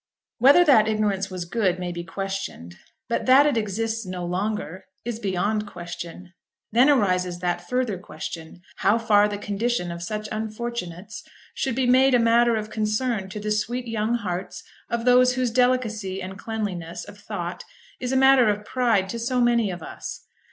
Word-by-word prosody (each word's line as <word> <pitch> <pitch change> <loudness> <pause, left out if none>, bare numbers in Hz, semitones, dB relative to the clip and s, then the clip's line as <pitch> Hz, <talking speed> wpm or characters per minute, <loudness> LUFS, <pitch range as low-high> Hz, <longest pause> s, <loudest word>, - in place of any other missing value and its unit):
Whether 280 +9 +7
that 225 -8 +6
ignorance 210 -3 0
was 185 -2 -5
good 185 -1 0
may 180 -1 -4
be 170 0 -5
questioned; 195 - -5 0.3
but 235 - -2
that 265 +3 +7
it 295 -4 +2
exists 225 +1 -1
no 185 -2 -5
longer 190 0 -3 0.2
is 235 -2 -4
beyond 205 +2 -1
question. 175 0 -8 0.4
Then 245 +6 +5
arises 185 -9 +2
that 175 0 -3
further 250 -7 -1
question, 165 0 -8
how 205 +4 +3
far 210 -2 +4
the 205 -1 -4
condition 205 -2 -2
of 170 0 -6
such 215 +4 -4
unfortunates 215 -4 -5 0.3
should 265 -3 -2
be 260 0 +1
made 260 +1 +5
a - - +4
matter 235 0 +4
of 215 0 -4
concern 215 -1 -1
to 210 - -6
the 210 0 -3
sweet 240 +4 -1
young 225 +1 0
hearts 190 -5 -4 0.3
of 235 0 -2
those 250 0 +5
whose 255 -2 0
delicacy 225 -6 +1
and 190 0 -6
cleanliness 195 -7 -4
of 205 - -13
thought 180 -4 -5 0.4
is 250 0 -3
a 265 - +2
matter 265 -3 +6
of 210 0 -2
pride 230 -7 +1
to 235 - -4
so 250 +2 0
many 235 -3 +3
of 175 -3 -6
us. - - -8
215 Hz, 175 wpm, -24 LUFS, 185-240 Hz, 0.4 s, Whether